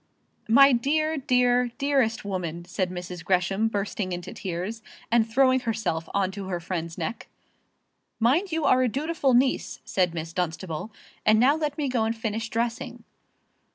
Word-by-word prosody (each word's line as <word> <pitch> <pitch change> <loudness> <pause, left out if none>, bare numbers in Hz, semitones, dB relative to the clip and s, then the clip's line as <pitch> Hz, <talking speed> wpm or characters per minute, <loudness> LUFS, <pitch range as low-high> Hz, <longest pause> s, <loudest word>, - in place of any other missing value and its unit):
"My 275 +5 +7
dear, 310 +6 +1
dear, 250 -2 +2
dearest 270 -7 +1
woman!" 175 -4 -4
said 180 +1 -2
Mrs. 180 -1 -7
Gresham, 195 +3 +1
bursting 200 -3 -2
into 175 0 -6
tears, 190 +4 -4 0.3
and 230 -1 +3
throwing 260 +2 +4
herself 215 -9 -2
on 195 -1 0
to 195 0 -7
her 180 -2 -2
friend's 170 -1 -4
neck. 235 - -4 0.9
"Mind 295 - +2
you 320 -2 -1
are 255 - +4
a 255 - +2
dutiful 280 0 +1
niece," 255 +2 +1
said 180 -3 0
Miss 165 0 -5
Dunstable. 175 +2 -3 0.3
"And 215 0 +5
now 265 +5 +5
let 300 -2 -2
me 295 -2 -1
go 250 -3 +1
and 225 +1 -2
finish 225 0 -3
dressing." 235 +1 -3
225 Hz, 155 wpm, -26 LUFS, 185-255 Hz, 0.9 s, My